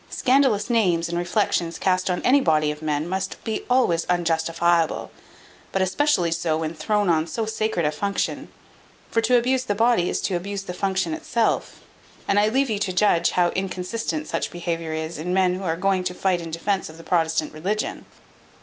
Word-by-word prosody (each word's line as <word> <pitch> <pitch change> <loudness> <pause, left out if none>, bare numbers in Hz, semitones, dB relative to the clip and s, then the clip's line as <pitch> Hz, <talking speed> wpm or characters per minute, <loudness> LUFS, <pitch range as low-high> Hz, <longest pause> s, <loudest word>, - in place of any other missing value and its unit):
Scandalous 255 -6 +2
names, 180 -8 +2
and 170 - -3
reflections 175 -1 0
cast 185 0 +1
on 180 - -1
any 275 +3 +5
body 155 - +2
of 150 +1 -8
men, 150 0 -1
must 190 +1 -3
be 220 -1 -2
always 245 -10 +2
unjustifiable; 170 -1 +1 0.6
but 195 - 0
especially 185 - +1
so, 165 -1 0
when 160 0 -3
thrown 210 +4 0
on 160 -1 +2
so 220 +8 -2
sacred 215 -6 -1
a 150 - +2
function; 200 +6 -2 0.6
for 230 - +2
to 250 +2 +4
abuse 255 +2 +1
the 205 - -1
body 225 -5 +3
is - - -1
to 190 - -1
abuse 195 +3 -4
the 180 - -6
function 190 - -1
itself; 300 -8 -1 0.5
and 200 - +3
I 210 +1 +3
leave 265 +5 +2
to 230 - -2
you 205 - -2
to 195 - -1
judge 180 -3 +3
how 175 -1 +3
inconsistent 180 -3 -3
such 165 - -2
behaviour 170 -2 -4
is 160 0 -4
in 180 +3 -2
men 185 -1 +3
who 185 - -4
are 165 -2 -1
going 190 0 +1
to 180 0 -2
fight 185 -2 0
in 165 - -7
defence 190 +4 -2
of 160 - -12
the 165 - -12
Protestant 160 -3 0
religion." 195 +8 -3
180 Hz, 195 wpm, -23 LUFS, 165-210 Hz, 0.6 s, any